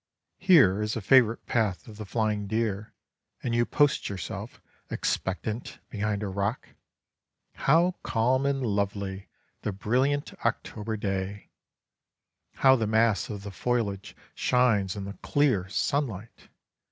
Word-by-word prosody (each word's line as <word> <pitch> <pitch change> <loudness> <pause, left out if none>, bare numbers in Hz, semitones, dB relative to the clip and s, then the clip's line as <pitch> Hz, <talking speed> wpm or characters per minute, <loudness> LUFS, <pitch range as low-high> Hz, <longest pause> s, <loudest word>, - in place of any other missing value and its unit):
Here 135 - +5
is 105 0 -1
a - - -1
favorite 115 0 +4
path 110 -6 0
of 105 -2 -11
the 105 -2 -7
flying 105 -2 -1
deer, 110 -1 -2 0.5
and 120 - -1
you 120 0 +2
post 145 -1 +2
yourself 95 -3 -6 0.3
expectant 105 +5 -3
behind 105 -1 -1
a - - -2
rock. 100 +5 -2 0.8
How 170 +6 +3
calm 130 +4 +1
and 135 -2 0
lovely 100 -2 -2 0.3
the 105 - -2
brilliant 130 +9 0
October 110 0 -2
day! 100 0 -4 1.1
How 130 0 +8
the 115 -4 0
mass 110 -3 +2
of 100 -2 -6
the 100 - -6
foliage 105 -3 -2 0.2
shines 110 -7 +2
in 100 -1 -5
the 100 - -6
clear 130 -11 +1
sunlight! 115 -3 -2
110 Hz, 130 wpm, -27 LUFS, 100-125 Hz, 1.1 s, How